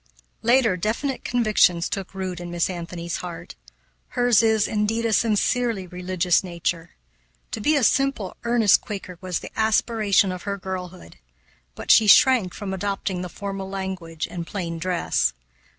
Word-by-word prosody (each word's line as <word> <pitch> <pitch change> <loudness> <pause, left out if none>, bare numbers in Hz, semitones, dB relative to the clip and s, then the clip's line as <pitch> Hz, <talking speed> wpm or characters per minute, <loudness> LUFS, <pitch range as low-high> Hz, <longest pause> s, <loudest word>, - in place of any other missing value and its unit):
Later, 235 -4 +3
definite 235 +8 -2
convictions 215 -7 +2
took 195 -1 -5
root 185 -2 -4
in 175 0 -7
Miss 175 +1 -1
Anthony's 170 -1 -5
heart. 175 -2 -8 0.5
Hers 245 -3 +3
is, 220 -2 +2
indeed, 220 +2 -1
a 225 - +1
sincerely 225 -1 +1
religious 180 0 0
nature. 170 -1 -4 0.6
To - - -4
be 305 +7 +3
a 280 - +2
simple, 270 -6 +1
earnest 235 -4 +4
Quaker 190 -4 -7
was 185 -3 -3
the - - -9
aspiration 215 -3 +2
of 180 -1 -6
her 200 -1 -3
girlhood; 185 - -7 0.6
but - - 0
she 220 - +6
shrank 225 -4 +5
from 195 -2 -5
adopting 190 -1 -3
the 180 - -5
formal 195 +1 -6
language 185 -4 -5
and 170 -2 -6
plain 170 -4 -4
dress. 170 - 0
190 Hz, 150 wpm, -23 LUFS, 180-220 Hz, 0.6 s, she